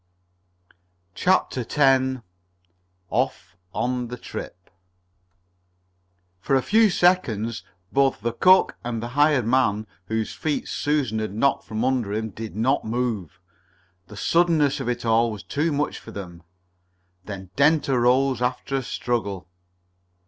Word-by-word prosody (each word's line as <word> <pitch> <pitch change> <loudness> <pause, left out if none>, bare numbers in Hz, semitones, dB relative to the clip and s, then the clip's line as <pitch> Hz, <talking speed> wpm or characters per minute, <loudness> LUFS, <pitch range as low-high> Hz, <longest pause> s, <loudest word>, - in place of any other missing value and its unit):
CHAPTER 180 - +1
X 130 -3 +3 0.9
OFF 85 - -2 0.2
ON 125 +3 -2
THE 125 +1 -7
TRIP 90 -5 -9 1.7
For 135 +8 0
a 130 - +2
few 220 0 +4
seconds 115 - +1 0.3
both 135 -5 +2
the 115 +1 -2
cook 185 +9 +4
and 115 -2 -3
the 120 - -4
hired 145 -1 +3
man, 110 -4 +2 0.2
whose 110 +1 -2
feet 155 -2 -2
Susan 140 -7 -1
had 110 -2 -4
knocked 140 +5 +1
from 110 +2 -2
under 125 -6 0
him, 110 0 -3
did 110 +2 -8
not 130 +6 +1
move. 110 -7 -3 0.7
The 105 - -12
suddenness 160 -3 +2
of 130 -3 -3
it 120 -1 -3
all 115 +1 +3
was 105 -2 -7
too 150 - -1
much 145 0 -1
for - - -13
them. 90 -4 -8 0.8
Then 95 -3 -8
Dent 150 +2 +3
arose 130 0 +2
after 125 +2 -1
a - - -1
struggle. 110 -7 -3
125 Hz, 130 wpm, -24 LUFS, 110-140 Hz, 1.7 s, few